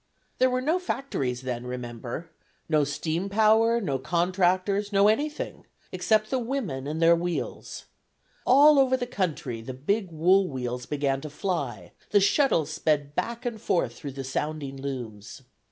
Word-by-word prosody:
There 255 - +5
were 255 0 0
no 320 +6 +2
factories 140 - -3
then, 125 -1 -4
remember: 125 +5 -6 0.4
no 155 -2 +3
steam 160 +6 -2
power, 220 +3 +4
no 140 - -2
contractors, 185 +5 +1
no 200 0 +5
anything 290 +8 -1 0.2
except 215 +4 +1
the 260 - +1
women 230 - -3
and 155 +2 -3
their 165 0 +6
wheels. 175 0 -4 0.6
All 285 +3 +7
over 260 -1 +4
the 245 - -2
country, 155 - -3
the 125 +3 -7
big 190 +8 -1
wool 180 +4 +3
wheels 125 -3 -4
began 140 -2 -1
to 155 - -6
fly, 140 - -3 0.2
the 205 - +5
shuttles 195 - +2
sped 145 -2 0
back 235 +8 -3
and 230 -3 -3
forth 175 - 0
through 140 -3 -8
the 135 0 -5
sounding 140 +1 -3
looms. 130 -4 -7
170 Hz, 155 wpm, -26 LUFS, 135-215 Hz, 0.6 s, All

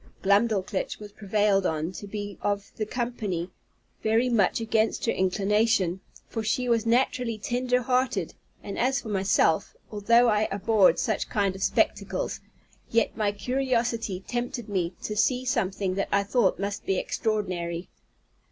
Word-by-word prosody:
Glumdalclitch 200 -1 +1
was 210 -1 -10
prevailed 205 -1 +1
on 160 -1 -1
to 200 +2 -8
be 205 -1 -6
of 200 -1 -2
the 215 - -2
company, 215 -8 -3 0.5
very 225 +3 +2
much 215 -5 +2
against 225 -1 0
her 230 - +2
inclination, 195 -1 +1 0.3
for 225 - -4
she 250 +4 0
was 230 -1 +1
naturally 245 -1 +1
tender 250 +3 0
hearted; 250 -8 0 0.3
and 200 - -5
as 260 +3 +2
for 220 - -8
myself, 190 -5 +2 0.2
although 230 +3 +4
I 215 -1 +2
abhorred 200 0 +4
such 220 -3 -1
kind 200 -2 0
of 195 - -9
spectacles, - - 0 0.5
yet 230 -1 +1
my 210 -2 +1
curiosity 235 -4 -1
tempted 240 -1 -3
me 185 -3 -1
to 210 - -3
see 250 +4 +1
something 190 -5 0
that 195 +1 -2
I 200 - +3
thought 205 -1 +2
must 200 +1 -3
be 195 - +1
extraordinary. 180 -7 -2
210 Hz, 145 wpm, -26 LUFS, 195-235 Hz, 0.5 s, although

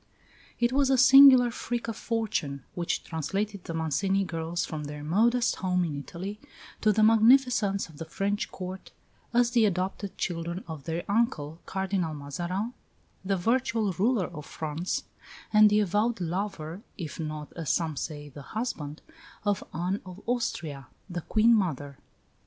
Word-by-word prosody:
It 240 0 +2
was 275 0 +3
a 265 - +4
singular 265 -1 +8
freak 240 0 -3
of 225 - -3
fortune 215 - -2
which 170 -1 -2
translated 195 +5 -3
the 165 - -5
Mancini 190 +5 +1
girls 165 -1 -2
from 155 -2 -5
their 145 0 -7
modest 230 +9 +2
home 180 -1 +1
in 155 -3 -3
Italy 190 +8 -7 0.4
to 215 - +4
the 215 +1 +3
magnificence 225 -2 +4
of 160 -3 -15
the 165 - -5
French 200 +5 -2
Court, 185 0 -7 0.4
as 240 0 +3
the 240 -2 +4
adopted 190 +1 -2
children 170 +1 -3
of 155 -4 -7
their 165 +1 -2
uncle, 200 - 0
Cardinal 190 -4 -1
Mazarin, 175 - -3 0.5
the 195 0 0
virtual 225 0 +1
ruler 210 +2 +2
of 150 -1 -9
France, 160 +3 -3 0.5
and 215 0 +8
the 210 +1 +4
avowed 210 +3 +1
lover 180 -1 -3 0.2
(if 165 -4 -6
not, 155 -2 -5
as 165 -5 -5
some 160 -3 +1
say, 145 +1 -5
the 145 0 -11 0.2
husband) 155 -11 -4 0.4
of 205 -1 +1
Anne 180 +5 -2
of 185 0 -10
Austria, 160 - -2 0.2
the 175 0 -3
Queen 220 +7 +4
mother. 145 - -1
190 Hz, 150 wpm, -28 LUFS, 160-220 Hz, 0.5 s, singular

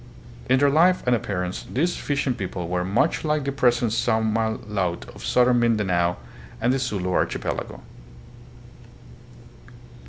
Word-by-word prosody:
In 130 - +5
their 140 +1 +3
life 175 +5 +4
and 125 -1 +3
appearance 90 -5 -4
these 170 +7 0
fishing 140 -2 -1
people 95 -5 -5
were 90 0 -1
much 105 - +1
like 150 -2 0
the 140 - -2
present 120 -4 +2
Samal 110 -1 0
laut 95 -5 -2
of - - -12
southern 125 -1 +3
Mindanao 95 -7 +1 0.4
and 120 +3 +2
the 135 - 0
Sulu 100 -8 -2
Archipelago. - - -2
115 Hz, 130 wpm, -24 LUFS, 95-130 Hz, 0.4 s, In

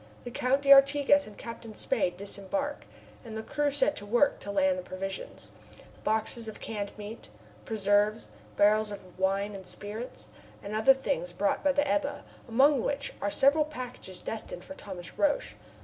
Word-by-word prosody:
The 245 - -7
Count 265 +3 +1
d'Artigas 280 0 +6
and 210 - -12
Captain 230 -1 -8
Spade 185 -9 0
disembark, 205 +9 -3 0.4
and 220 -2 -7
the 220 - -4
crew 295 +3 0
set 290 +1 +2
to - - -5
work 240 +6 +3
to - - -8
land 280 +6 +2
the - - -4
provisions 195 -3 -6 0.5
boxes 220 +1 0
of 220 - -8
canned 205 -2 -4
meat, 210 - -8 0.4
preserves, 210 +1 +2 0.3
barrels 215 +1 +4
of 185 -3 -10
wine 195 +2 +1
and 190 -2 -9
spirits, 215 +7 -7 0.3
and 200 - -6
other 220 +5 +5
things 265 -9 -2
brought 200 +2 0
by 290 - +4
the 285 +1 +2
Ebba, 280 +8 0 0.2
among 265 +3 +4
which 280 +2 -2
are 205 - 0
several 280 +8 +4
packages 250 -10 -7
destined 200 -5 -6
for 285 - -8
Thomas 185 -10 -9
Roch. 295 -1 +1
225 Hz, 165 wpm, -29 LUFS, 205-275 Hz, 0.5 s, d'Artigas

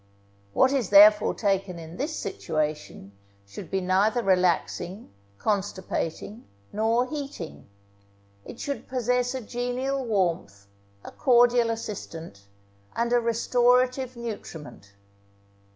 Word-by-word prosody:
What 260 +1 +4
is 255 -8 0
therefore 210 +1 +7
taken 195 -3 -1
in 165 0 -10
this 305 +4 -3
situation 155 - -4 0.3
should 100 0 -10
be 190 - -1
neither 200 +6 +2
relaxing, 185 +1 0 0.3
constipating, 200 - -3 0.3
nor 225 +3 +2
heating; 275 - -7 0.8
it - - -11
should 280 -1 -5
possess 250 0 0
a 260 - -3
genial 245 +4 -3
warmth, 170 - -1 0.4
a - - -9
cordial 245 -3 +4
assistant, 165 - -7 0.5
and 235 +1 0
a 245 - +5
restorative 250 +2 +1
nutriment. 155 - -8
220 Hz, 105 wpm, -26 LUFS, 180-245 Hz, 0.8 s, therefore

